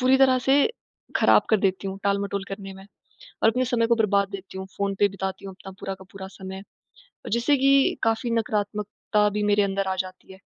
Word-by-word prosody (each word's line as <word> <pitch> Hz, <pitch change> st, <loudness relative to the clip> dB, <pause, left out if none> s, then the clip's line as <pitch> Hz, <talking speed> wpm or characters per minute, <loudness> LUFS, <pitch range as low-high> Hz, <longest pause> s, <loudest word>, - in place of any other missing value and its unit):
पूरी 255 Hz, +1 st, +5 dB
तरह 260 Hz, -1 st, +5 dB
से 270 Hz, -, +5 dB, 0.6 s
ख़राब -, -, +5 dB
कर 220 Hz, -, +6 dB
देती 195 Hz, 0 st, 0 dB
हूँ, 190 Hz, 0 st, -6 dB
टालमटोल 200 Hz, 0 st, 0 dB
करने 195 Hz, 0 st, -7 dB
में। 190 Hz, 0 st, -12 dB, 0.6 s
और 220 Hz, -, +7 dB
अपने 255 Hz, +3 st, 0 dB
समय 235 Hz, -2 st, +1 dB
को 235 Hz, -, +4 dB
बर्बाद 200 Hz, -3 st, +2 dB
देती 195 Hz, -1 st, -8 dB
हूँ, 190 Hz, -, -5 dB
फ़ोन 200 Hz, 0 st, -1 dB
पे 205 Hz, -, +5 dB
बिताती 190 Hz, 0 st, -5 dB
हूँ 195 Hz, -, -7 dB
अपना 195 Hz, 0 st, -11 dB
पूरा 195 Hz, -, -4 dB
का 190 Hz, -, -14 dB
पूरा 190 Hz, -1 st, -8 dB
समय, 190 Hz, 0 st, -9 dB, 0.7 s
जिससे 235 Hz, +5 st, +3 dB
कि 275 Hz, +1 st, +4 dB
काफ़ी 225 Hz, +1 st, +1 dB
नकारात्मकता 210 Hz, -1 st, 0 dB
भी 210 Hz, +1 st, -2 dB
मेरे 205 Hz, 0 st, +4 dB
अंदर 195 Hz, 0 st, -1 dB
आ 190 Hz, -, -1 dB
जाती 185 Hz, +1 st, -14 dB
है। 190 Hz, -, -14 dB
200 Hz, 205 wpm, -25 LUFS, 195-230 Hz, 0.7 s, और